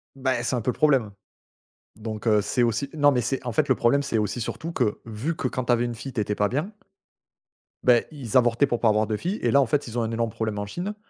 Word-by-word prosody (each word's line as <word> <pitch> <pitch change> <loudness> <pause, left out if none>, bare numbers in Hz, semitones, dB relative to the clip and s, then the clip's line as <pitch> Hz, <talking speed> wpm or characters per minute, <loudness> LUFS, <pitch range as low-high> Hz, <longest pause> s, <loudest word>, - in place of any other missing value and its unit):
Bah, 130 -2 0
c'est 120 - -1
un 120 - -1
peu 120 - -2
le - - -8
problème, 135 -8 +3 0.9
donc 110 0 -6
heu, 105 -2 +4
c'est 105 +5 0
aussi 120 +3 0
non 145 -2 +4
mais 125 - +1
c'est 125 +3 -2
en 120 - -2
fait - - +1
le - - +4
problème 130 +5 +2
c'est 140 -4 -2
aussi 105 +3 -1
surtout 160 +8 -4
que, 120 -9 0
vu 115 +9 -4
que 130 - -1
quand 130 0 -4
tu 125 - +3
avais 120 0 +2
une 120 -1 -3
fille 130 +4 -8
tu 115 - 0
étais 105 0 -1
pas 105 0 +1
bien 150 - -2 1.1
beh 120 -2 +4
ils 130 -7 -1
avortaient 120 +2 +3
pour 120 -3 -1
pas 115 - +3
avoir 105 0 +2
de 105 0 -1
fille 185 - -3
et - - +1
là 140 - +5
en - - +3
fait 140 +4 -1
ils 115 +1 -6
ont - - +1
un 115 0 -2
énorme 115 0 -1
problème 110 -1 -3
en 105 - -3
Chine. 180 - -5
120 Hz, 275 wpm, -25 LUFS, 110-135 Hz, 1.1 s, là